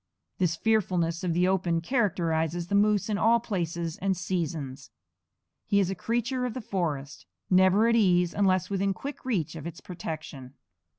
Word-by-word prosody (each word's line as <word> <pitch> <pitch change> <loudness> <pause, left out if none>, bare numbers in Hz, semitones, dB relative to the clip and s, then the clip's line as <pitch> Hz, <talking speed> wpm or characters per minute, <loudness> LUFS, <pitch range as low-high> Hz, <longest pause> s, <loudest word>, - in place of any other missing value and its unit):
This 175 -3 +2
fearfulness 180 -5 0
of 180 - 0
the 175 +2 +2
open 180 -3 +1
characterizes 170 - 0
the - - -3
moose 205 -1 +3
in 210 -2 -1
all 230 +1 +4
places 170 -7 -3
and 190 0 0
seasons. 160 -7 -3 0.8
He 200 - +3
is 190 -2 +1
a - - 0
creature 240 +6 -1
of 245 -3 -3
the - - -3
forest, 155 - -3 0.2
never 190 +4 +5
at 230 - +3
ease 180 -5 +3
unless 185 -2 +1
within 195 0 0
quick 280 +7 -7
reach 190 - -1
of 160 0 -6
its 170 - -8
protection. 155 -6 -7
185 Hz, 165 wpm, -27 LUFS, 165-205 Hz, 0.8 s, never